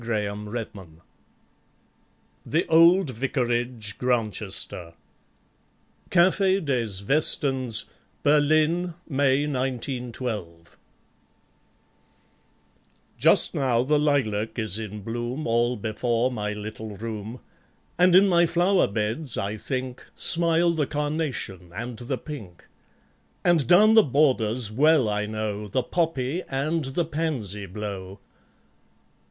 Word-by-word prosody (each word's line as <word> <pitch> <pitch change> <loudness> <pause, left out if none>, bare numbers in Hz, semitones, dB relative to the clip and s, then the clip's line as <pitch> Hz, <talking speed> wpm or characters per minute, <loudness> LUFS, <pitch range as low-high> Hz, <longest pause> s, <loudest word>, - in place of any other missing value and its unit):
Grantchester 105 -5 -5 1.4
The - - 0
Old 170 0 +5
Vicarage, 120 -3 -2
Grantchester 105 -8 -2 1.1
(Cafe 190 +2 +3
des 130 -8 -1 0.2
Westens, 135 -5 +2 0.4
Berlin, 155 +4 +2
May 140 -1 +1
1912) 125 - -4 2.4
Just - - +5
now 125 -3 +1
the 150 +3 +2
lilac 115 -8 0
is 110 -2 -2
in 105 -2 -7
bloom, 120 +6 -4
All 120 +2 +1
before 115 +3 -1
my 105 -3 -3
little 105 0 -7
room; 110 +2 -6 0.6
And 180 0 +5
in 195 +2 +7
my 175 -2 +4
flower 175 +3 +2
beds, 110 +7 -2
I 100 +1 -2
think, 130 +2 -5
Smile 170 0 +3
the 155 -4 -1
carnation 145 - -3
and 120 +1 -6
the 125 +2 -3
pink; 115 - -10 0.8
And 170 -5 +3
down 210 +5 +6
the 220 - +8
borders, 125 - +1
well 145 +1 +3
I 105 0 -1
know, 105 -1 -4
The 125 +6 -1
poppy 165 -2 -1
and 150 +4 -1
the 135 +6 -1
pansy 130 - -3
blow 95 -1 -7
125 Hz, 100 wpm, -25 LUFS, 110-150 Hz, 2.4 s, the